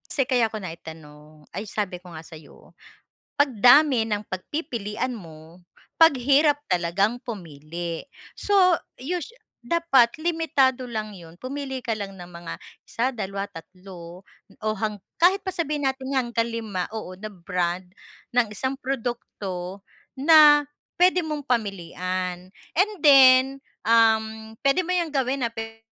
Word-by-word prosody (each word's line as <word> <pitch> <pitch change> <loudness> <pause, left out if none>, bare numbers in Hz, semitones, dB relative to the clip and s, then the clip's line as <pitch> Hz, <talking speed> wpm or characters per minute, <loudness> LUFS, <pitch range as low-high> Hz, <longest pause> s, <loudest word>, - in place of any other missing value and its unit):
Kasi 270 -4 0
kaya 245 -4 +2
ko 215 - -5
naitanong 155 -4 -11
ay 200 - -3
sabi 205 -3 -3
ko 180 - -12
nga 160 - -8
sa'yo, 160 -1 -15 0.6
"'Pag 280 -6 +1
dami 250 0 +6
ng 210 -2 -2
pagpipilian 225 - -4
mo, 165 -4 -12 0.4
'pag 325 -3 +7
hirap 285 +3 +4
talagang 185 +6 +1
pumili." 170 - -6 0.3
So 410 - -1 0.5
us 345 +3 -3 0.4
dapat 265 -4 +3
limitado 285 -7 +1
lang 215 -2 -4
yun, 165 -1 -13
pumili 265 0 -5
ka 235 -3 -1
lang 195 -1 -6
ng 175 0 -10
mga, 170 -1 -7 0.3
1, 245 +3 -1
2, 200 -2 -4
3, 180 0 -12 0.4
o - - -5
hang 215 0 -2 0.2
kahit 370 +4 +4
pa 380 - -3
sabihin 300 -4 -1
natin 265 +1 -6
nga 260 - +3
hanggang 235 -1 -1
5, 210 -6 -3
oo, 215 -4 -6
na 215 - -7
brand 180 -1 -3 0.5
ng 245 -1 +4
isang 260 +6 -2
produkto 205 -8 -5 0.4
na 295 0 +7 0.4
pwede 360 0 +5
mong 300 -2 -4
pamilian. 185 -4 -2 0.3
And 405 +4 +3
then, 265 -3 +8 0.4
um, 220 -1 +2
pwede 275 +6 +3
mo 365 - -1
yang 340 -3 0
gawin, 265 0 0
ah, - - -4
pwe 225 0 -7
225 Hz, 140 wpm, -24 LUFS, 185-275 Hz, 0.6 s, then